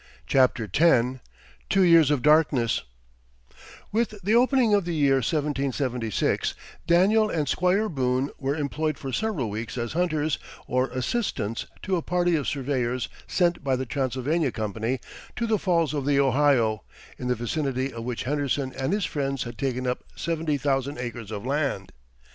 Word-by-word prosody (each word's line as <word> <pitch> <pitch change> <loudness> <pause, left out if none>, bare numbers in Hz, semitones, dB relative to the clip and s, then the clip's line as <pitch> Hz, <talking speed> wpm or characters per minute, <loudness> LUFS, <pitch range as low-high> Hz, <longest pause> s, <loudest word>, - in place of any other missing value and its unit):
CHAPTER 130 -4 +2
X 130 - +3 0.5
TWO 195 - +4
YEARS 165 -4 +6
OF 145 -4 +1
DARKNESS 150 -6 +3 1.1
With 220 0 0
the 205 +4 +1
opening 245 -2 +4
of 200 -1 +4
the 170 -1 -3
year 140 -3 +3
1776 135 -4 -1 0.3
Daniel 205 +6 +4
and 155 -6 -1
Squire 185 +8 +2
Boone 130 -4 0
were 140 +1 -1
employed 155 0 -2
for 135 -3 -6
several 180 - -1
weeks 110 +4 -5
as 120 -1 -3
hunters 155 -3 0 0.3
or 130 +1 +1
assistants 125 - -2 0.2
to 190 -1 0
a - - -1
party 175 0 +1
of 150 - -1
surveyors 130 -3 -1 0.2
sent 175 -3 +1
by 135 -2 +1
the 130 +1 -3
Transylvania 135 +3 -1
Company 110 +4 -2 0.4
to 235 - -1
the 220 -2 +1
Falls 170 -5 +1
of 145 -2 -2
the 140 -1 +3
Ohio, 130 -6 +3 0.4
in 125 - -4
the 125 - +1
vicinity 130 +2 -2
of 115 -1 -6
which 120 0 -3
Henderson 140 -1 -1
and 135 +7 -1
his 205 -2 0
friends 135 -3 -2
had 120 -1 -7
taken 130 +1 -2
up 125 0 -2
seventy 160 -3 -1
thousand 140 0 -1
acres 120 -3 -6
of 105 0 -6
land. 135 -9 -1
140 Hz, 160 wpm, -25 LUFS, 125-165 Hz, 1.1 s, YEARS